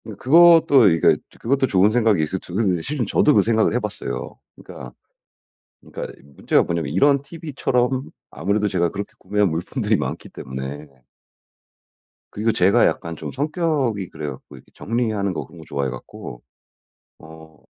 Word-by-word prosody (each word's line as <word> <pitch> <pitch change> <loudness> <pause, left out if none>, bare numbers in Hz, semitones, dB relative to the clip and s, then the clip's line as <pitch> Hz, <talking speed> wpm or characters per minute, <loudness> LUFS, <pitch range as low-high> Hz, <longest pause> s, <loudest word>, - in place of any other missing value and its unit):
그 110 - -8
그것도 160 - +6
이게 80 -2 +4 0.2
그것도 135 +2 +1
좋은 100 0 +3
생각이 110 -7 +2
있을 95 +5 -3
줄은 90 -2 -1
실은 135 - -2
저도 150 +8 +3
그 100 - +6
생각을 110 0 +2
해봤어요. 105 -4 -4 0.2
그러니까, 60 -1 -11 0.9
그러니까 - - -8
문제가 70 -1 +1
뭐냐면 85 -4 -3
이런 140 - +3
티브이처럼 135 -4 -2 0.2
아무래도 100 +6 -1
제가 85 -3 0
그렇게 100 +4 -6
구매한 105 -1 0
물품들이 105 - -1
많기 - - -4
때문에. 65 +3 -7 1.5
그리고 110 +2 0
제가 95 -1 +4
약간 85 0 -2
좀 - - -6
성격이 145 - -1
그래 75 -1 -6
갖고 65 - -11 0.2
정리하는 110 -4 -2
거 - - -5
그런 85 - -16
거 80 - -12
좋아해 70 -1 -2
갖고 - - -10 0.8
어 80 -1 -15
105 Hz, 340 characters per minute, -21 LUFS, 80-125 Hz, 1.5 s, 그것도